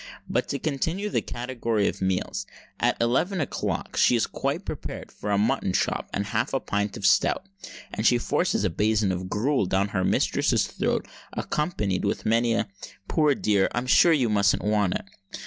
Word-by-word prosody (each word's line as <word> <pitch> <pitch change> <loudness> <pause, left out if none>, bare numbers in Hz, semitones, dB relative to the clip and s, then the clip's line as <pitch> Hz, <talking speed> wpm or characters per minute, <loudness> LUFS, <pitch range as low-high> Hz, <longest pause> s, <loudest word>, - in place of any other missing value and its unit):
But—to 140 - -1
continue 160 +8 -2
the - - +1
category 120 -4 -2
of - - -3
meals—at 95 +1 -2
eleven 130 +11 +1
o'clock 145 - -3
she - - +5
is 115 - +2
quite 145 +8 -3
prepared 150 - -6
for 105 - -6
a 100 - +2
mutton 110 -2 +1
chop - - 0
and 100 - -2
half 110 +5 -1
a - - +2
pint 100 -3 -2
of 100 - -4
stout; 185 - +3 0.5
and 110 - -2
she 120 +2 +5
forces 150 +7 0
a 95 - +1
basin 105 +1 +1
of 90 0 -4
gruel 120 0 +1
down 95 +2 +1
her 95 -3 -1
mistress's - - +2
throat, - - -2 0.3
accompanied 105 - -1
with 100 - -1
many 115 +1 +2
a - - 0 0.4
"Poor 150 -3 +3
dear, 100 -5 +2
I'm 120 +1 -1
sure 170 +6 +6
you 140 -7 +3
must 100 -2 +3
want 105 -3 +1
it!" - - -4
110 Hz, 175 wpm, -26 LUFS, 100-135 Hz, 0.5 s, sure